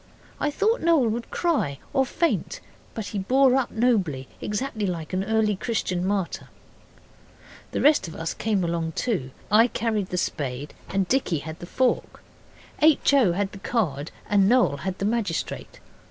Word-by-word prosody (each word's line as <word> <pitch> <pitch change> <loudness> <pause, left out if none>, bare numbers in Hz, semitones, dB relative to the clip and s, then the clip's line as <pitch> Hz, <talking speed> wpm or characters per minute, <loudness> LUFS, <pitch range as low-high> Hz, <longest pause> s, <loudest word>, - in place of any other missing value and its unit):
I 295 - +1
thought 420 +10 +1
Noel 320 -8 +4
would 235 +2 -3
cry 290 - 0 0.2
or 265 -1 +2
faint. 335 +5 -1 0.4
But 220 -3 -4
he 205 - -3
bore 260 +6 +4
up 265 -2 +1
nobly 195 - +1
exactly 215 -1 -2
like 170 -2 -4
an 185 +1 0
early 215 0 +1
Christian 185 -4 -2
martyr. 195 -2 -2 1.2
The - - -2
rest 295 - +4
of 160 - -9
us 165 0 -3
came 210 -4 0
along 165 -1 -1
too. 180 - -1 0.2
I 225 +3 +6
carried 220 -5 -1
the 180 - -2
spade 140 -4 -3 0.2
and 195 -1 0
Dicky 250 -9 +1
had 160 +3 -7
the 175 - -8
fork. 255 +6 0 0.6
H. 305 -2 +5
O. 245 -11 +5
had 195 +2 -1
the 200 - -10
card, 160 - -1 0.2
and 200 -1 +4
Noel 240 - +3
had 185 +5 -4
the 195 - -2
magistrate. 210 -6 -2
205 Hz, 165 wpm, -25 LUFS, 175-245 Hz, 1.2 s, I